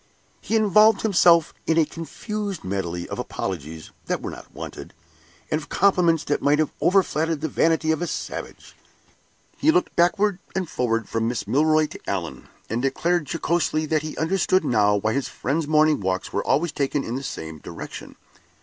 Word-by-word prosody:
He 225 - -2
involved 215 0 +5
himself 175 -6 +4
in 160 - +2
a 160 - +5
confused 200 +4 -5
medley 90 -3 -3
of - - -6
apologies 80 0 -5 0.2
that - - -1
were - - -5
not - - -11
wanted, - - -9 0.6
and 155 - +1
of 150 - -13
compliments 175 -5 +3
that 145 - -1
might 145 +1 +3
have 155 -1 +1
overflattered 165 -4 +2
the 160 - -1
vanity 160 +1 +2
of 160 - -1
a 175 - -1
savage. - - -6 0.8
He - - +3
looked 360 +3 +2
backward 195 +3 +2 0.2
and 190 -2 -1
forward 115 -6 -1
from 115 0 -1
Miss 120 +1 -3
Milroy 155 +3 +3
to - - -9
Allan, 90 -4 -4 0.2
and 115 +2 -2
declared 155 +4 0
jocosely 165 -2 0
that 155 -1 +2
he 155 0 -7
understood 185 +1 +1
now 105 -5 +3
why 110 +2 0
his 140 -1 -1
friend's 150 +4 -2
morning 155 0 +4
walks 95 -1 -2
were 100 - 0
always 160 +3 +1
taken 140 0 -1
in 115 - -4
the 130 - -3
same 80 - -6
direction. - - -9
155 Hz, 175 wpm, -23 LUFS, 125-175 Hz, 0.8 s, involved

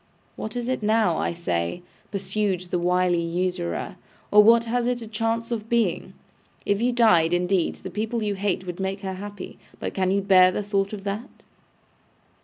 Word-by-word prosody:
'What 220 - -6
is 245 -1 -3
it 260 -2 -1
now, 215 -5 +2
I - - 0
say,' 130 - -2 0.3
pursued 195 -1 -1
the 180 -1 -3
wily 180 0 +2
usurer, 175 +1 -2 0.3
'or 210 - +8
what 230 +2 +6
has 240 +1 -1
it 245 -1 -1
a - - -8
chance 225 +2 -2
of 225 -1 -3
being? 235 -1 0 0.5
If 200 +1 +1
you 245 +1 +2
died, 175 -9 +4
indeed, 180 0 +1
the 190 - -9
people 220 +3 -2
you 205 -1 0
hate 190 -1 -2
would 180 0 -6
make 190 +1 -3
her 190 -1 -4
happy. 205 +1 -8 0.2
But - - -4
can 185 -1 0
you 200 +1 +2
bear 185 -2 +6
the 205 - -3
thought 200 -1 0
of 205 -2 -7
that? 205 +6 -4
200 Hz, 185 wpm, -24 LUFS, 180-220 Hz, 0.5 s, or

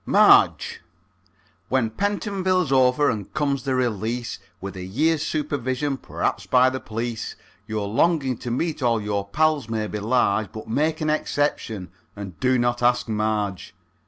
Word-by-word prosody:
MARGE. - - +4 0.9
When 125 -4 +1
Pentonville's 190 - 0
over 130 +2 +4
and 105 -4 -5
comes 140 -2 0
the 135 -1 0
release, 120 -1 -2 0.2
With 100 +1 -7
a 95 - -6
year's 150 - +1
supervision 145 -3 -2
perhaps - - -3
by 130 0 +5
the 130 - -3
p'lice, 115 0 -4 0.3
Your 110 -2 -2
longing 135 +3 +2
to 120 - -6
meet 150 +6 -2
all 120 -3 +2
your 100 -1 -2
pals 150 0 +1
may 110 -1 -1
be 105 0 -4
large, 110 -2 +1
But 110 -1 -8
make 150 +9 0
an 155 0 +1
exception, 120 -11 -1 0.2
and 100 -4 -8
do 130 0 +3
not 120 0 0
ask 125 0 +2
Marge. 105 -3 -2
125 Hz, 150 wpm, -23 LUFS, 110-145 Hz, 0.9 s, by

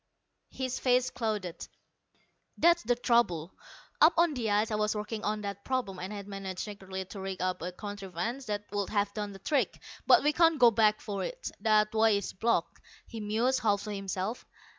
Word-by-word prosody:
His 260 -1 -3
face 250 0 +2
clouded. 210 -7 -3 0.9
"That's 340 +1 +5
the 245 +2 +1
trouble. 235 -9 +1 0.5
Up 320 +2 +8
on 335 -2 +4
the 235 -5 -2
ice 210 +2 +2
I - - +1
was 210 0 0
working 210 +1 -4
on 210 0 -1
that 200 -1 -5
problem, 245 -8 -2
and 185 +3 -5
had 200 -1 -7
managed 195 -2 -5
secretly 190 -2 -6
to 195 +2 -9
rig 190 -1 -4
up 185 0 -1
a 180 +2 -3
contrivance 205 +5 -5
that 205 -1 -3
would 205 -2 -2
have 205 -1 0
done 210 -1 -4
the 195 - -9
trick. 275 +8 0 0.3
But - - +7
we 295 +1 +3
can't 330 -1 +4
go 240 -3 +7
back 215 -1 +3
for 200 -2 -4
it. - - -5
That 215 -1 +3
way 220 -1 +4
is 200 - -4
blocked." 185 -4 0 0.2
He 230 - -8
mused, 225 +5 +1
half 205 -3 +1
to 210 0 -5
himself. 195 +2 -3
210 Hz, 190 wpm, -30 LUFS, 195-235 Hz, 0.9 s, Up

